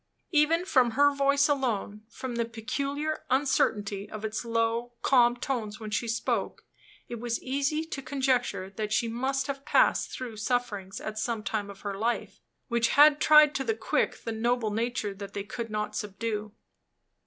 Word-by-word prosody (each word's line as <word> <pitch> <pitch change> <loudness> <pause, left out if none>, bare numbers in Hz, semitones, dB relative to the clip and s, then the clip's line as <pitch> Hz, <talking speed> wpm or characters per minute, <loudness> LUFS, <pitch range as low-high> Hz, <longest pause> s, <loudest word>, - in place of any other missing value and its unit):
Even 325 +2 +3
from 255 -9 +3
her 285 0 +5
voice 280 0 +3
alone 235 -7 -1
from 255 +1 -6
the 235 0 0
peculiar 280 +7 -3
uncertainty 210 -7 +1
of 215 0 -6
its 220 +2 -3
low, 230 +1 -1
calm 245 -2 +4
tones 235 -5 -3
when 215 -1 -7
she 230 +3 -1
spoke 230 +1 -2 0.4
it 235 - -6
was 235 0 -2
easy 280 +4 0
to 290 -4 -6
conjecture 260 -8 0
that 210 +1 -4
she 230 +2 +1
must 265 +4 -1
have 275 0 -5
passed - - +3
through 240 -4 -6
sufferings, 210 -4 -2
at 215 0 -5
some 225 -1 -2
time 205 0 -2
of 200 -1 -11
her 200 -1 -4
life, 230 +4 -2 0.3
which 235 -1 +2
had 295 0 +7
tried 300 -1 +7
to 270 - -1
the 440 - 0
quick - - -1
the 230 - -3
noble 230 0 0
nature 225 -1 -2
that 200 0 -9
they 200 - -2
could 230 +3 -6
not 210 0 -3
subdue. 210 +1 -3
235 Hz, 170 wpm, -28 LUFS, 215-275 Hz, 0.4 s, had